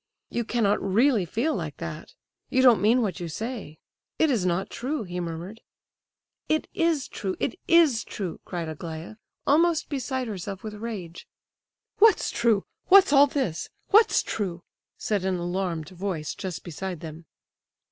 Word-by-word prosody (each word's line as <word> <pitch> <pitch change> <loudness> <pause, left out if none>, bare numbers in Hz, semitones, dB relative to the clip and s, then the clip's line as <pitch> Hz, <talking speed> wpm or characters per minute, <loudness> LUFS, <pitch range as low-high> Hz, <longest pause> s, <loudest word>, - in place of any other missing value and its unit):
"You 235 - -1
cannot 215 -3 +1
really 215 +1 +3
feel 245 - 0
like - - -4
that! - - -7 0.3
You 260 0 +3
don't 235 -7 +6
mean 235 +4 +4
what 195 -3 -2
you 175 - -4
say. 215 -3 -5 0.4
It 315 - +3
is 205 -8 +1
not 180 +2 -1
true," 260 +1 -3
he 180 -2 -5
murmured. 175 +6 -6 0.9
"It 310 0 +1
is 330 -5 +1
true, 190 -2 -4
it - - -1
is 320 -9 +5
true," 185 -5 -5
cried 170 -2 -4
Aglaya, 160 +5 -7 0.3
almost 330 +2 +3
beside 260 -2 -2
herself 195 -2 -6
with 215 -1 -5
rage. 205 -6 -7 0.7
"What's 435 -1 +5
true? 230 -4 +2 0.2
What's 380 -5 +7
all 285 0 +8
this? 260 - -2 0.2
What's 435 +2 +5
true?" 180 -5 -3 0.3
said 205 -3 -1
an 190 -1 0
alarmed 175 -3 -2
voice 180 -4 -4
just 185 -3 -6
beside 175 0 -5
them. 160 0 -9
205 Hz, 150 wpm, -26 LUFS, 175-260 Hz, 0.9 s, all